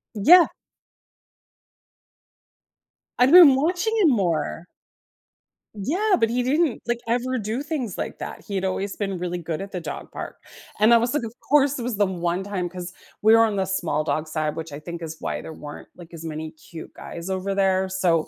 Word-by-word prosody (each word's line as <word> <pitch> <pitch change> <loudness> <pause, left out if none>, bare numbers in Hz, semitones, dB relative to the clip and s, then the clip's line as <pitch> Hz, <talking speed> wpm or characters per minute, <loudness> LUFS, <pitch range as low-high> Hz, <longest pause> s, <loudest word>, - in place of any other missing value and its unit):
Yeah. 335 - +7 2.7
I've 255 +4 +5
been 335 -7 +9
watching 360 +10 0
him 345 -7 +5
more. 170 - -1 1.1
Yeah, 360 - +1
but 225 - +2
he 245 +2 0
didn't, 290 +1 +1
like, 240 0 0
ever 250 +2 0
do 220 +5 -3
things 285 - -4
like - - -5
that; - - -7
he 200 - -5
had 190 - -1
always 195 +1 -2
been 195 -3 -3
really 180 0 -3
good 165 0 -4
at 195 - -7
the 185 - -4
dog - - -7
park, - - -7 0.4
and 220 +3 +6
I - - +8
was 235 +3 0
like, 295 -5 0
"Of 225 0 -6 0.2
course, 285 -1 +4
it 240 - -5
was 240 -4 -3
the 205 - +3
one 175 0 -2
time" 185 -3 -3
'Cause 180 0 -7 0.3
we 220 +2 +6
were 225 - +6
on 210 -2 -2
the 190 - +1
small 175 -5 -1
dog 155 0 -2
side, 155 -1 -2
which 160 -1 -6
I 145 - -7
think 170 +2 -8
is 160 -1 -6
why - - -3
there 160 - -9
weren't, 145 -1 -10
like, 170 -1 -14
as 165 -1 -9
many 155 0 -5
cute 160 0 -12
guys 170 +2 -8
over 190 +1 -2
there, 190 -1 +1
so, 175 -4 +1
195 Hz, 195 wpm, -23 LUFS, 170-245 Hz, 2.7 s, been